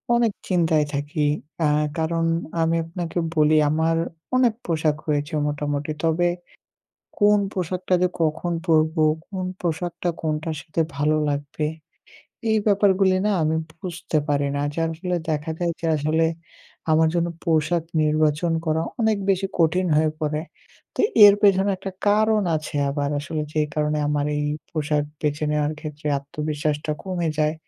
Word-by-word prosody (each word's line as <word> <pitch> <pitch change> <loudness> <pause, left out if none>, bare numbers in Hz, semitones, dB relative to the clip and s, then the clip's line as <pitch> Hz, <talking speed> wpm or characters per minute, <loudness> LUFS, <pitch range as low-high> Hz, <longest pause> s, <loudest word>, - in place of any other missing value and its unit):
অনেক 235 -2 +3 0.2
চিন্তায় 160 -4 +2
থাকি 145 +1 -1 0.4
আ - - +4 0.3
কারণ 165 +1 0 0.4
আমি 165 +1 +2
আপনাকে 170 0 -5 0.2
বলি 155 0 +4
আমার 160 +2 +1 0.4
অনেক 245 -3 +4
পোশাক 155 -3 +1
হয়েছে 145 +2 -1
মোটামুটি। 145 0 -2
তবে 165 +2 +2 0.9
কোন 210 0 +5
পোশাকটা 185 0 -1
যে 180 - +4
কখন 160 +2 0
পরবো? 160 0 +3 0.3
কোন 185 -2 -4 0.2
পোশাকটা 175 +1 -2
কোনটার 155 0 -2
সাথে 165 +1 -3 0.2
ভালো 150 +2 +2
লাগবে? 145 +1 -2 0.8
এই 220 - +4
ব্যাপারগুলি 195 -2 +4
না - - +2
আমি 155 +1 +1 0.2
বুঝতে 170 -3 -2
পারি 145 -1 +1
না। - - 0
যার 165 0 0
ফলে 180 -1 -1
দেখা 150 +1 -2
যায় 175 -1 0
যে 165 - -2
আসলে 155 +2 +1 0.7
আমার 160 +1 +4
জন্য 170 0 +1 0.2
পোশাক 165 0 +1 0.2
নির্বাচন 155 +2 +2
করা 160 +1 +1 0.2
অনেক 220 -1 +3
বেশি 195 0 +1
কঠিন 180 +3 +3
হয়ে 155 0 +3
পড়ে। 150 0 -1 0.5
তো - - -2 0.3
এর 200 - +8
পেছনে 200 0 +4
একটা 195 +1 -6 0.2
কারণ 215 0 +3
আছে 155 -1 -6
আবার 145 0 -1
আসলে 155 +1 -3
যে 155 - +1
কারণে 150 0 0
আমার 145 0 0
এই 145 - -1 0.3
পোশাক 150 -2 0 0.2
বেছে 150 0 -1
নেওয়ার 150 0 +1
ক্ষেত্রে 150 -1 -7
আত্মবিশ্বাসটা 150 +1 -3
কমে 180 -3 -2
যায়। 155 +1 +2
160 Hz, 145 wpm, -23 LUFS, 150-175 Hz, 0.9 s, এর